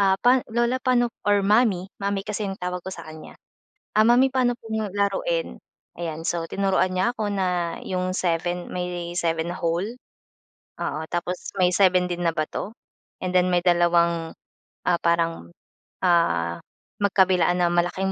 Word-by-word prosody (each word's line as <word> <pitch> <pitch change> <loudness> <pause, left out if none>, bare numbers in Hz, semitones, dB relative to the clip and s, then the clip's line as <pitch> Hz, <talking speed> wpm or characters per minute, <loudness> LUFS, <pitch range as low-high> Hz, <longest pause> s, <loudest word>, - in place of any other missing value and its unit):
"Ah, 195 -1 +4
pa 250 +2 +5
lola 240 +2 0
pano" 245 -2 +2 0.2
or 205 -1 +3
mommy 205 -3 +3 0.2
mommy 200 0 -1
kasi 210 -1 -3
yung 195 - -5
tawag 180 0 -3
ko - - -5
sa 165 - -9
kanya. 155 0 -11 0.6
"Ah, 215 - +6
mommy 250 +3 +5
pano 250 -2 +2
po 225 - -14 0.3
laruin?" 205 - -1 0.4
Ayan, 165 -2 -4
so 170 -1 0
tinuruan 195 -1 +1
niya 190 +6 +1
ako 215 -1 -1
na 180 -3 -1
'yong 185 0 -2
seven 175 0 -1
may 175 -1 -4
7 165 -1 0
na - - -6
hole, 175 +7 -1 0.9
oo, 155 - -2
tapos 175 +1 -3
may 180 -1 +4
7 185 -2 +4
din 175 0 -3
na 165 - 0
bato, 155 +7 -3 0.5
and 185 - -1
then 180 0 +4
may 175 - +3
dalawang, 170 -2 +2 0.5
ah, 175 -1 +3
parang, 165 - 0 0.5
ah, 170 - +2 0.4
magkabilaan 185 -3 +3
na 175 - +3
malaking 175 +2 0
180 Hz, 155 wpm, -24 LUFS, 170-200 Hz, 0.9 s, Ah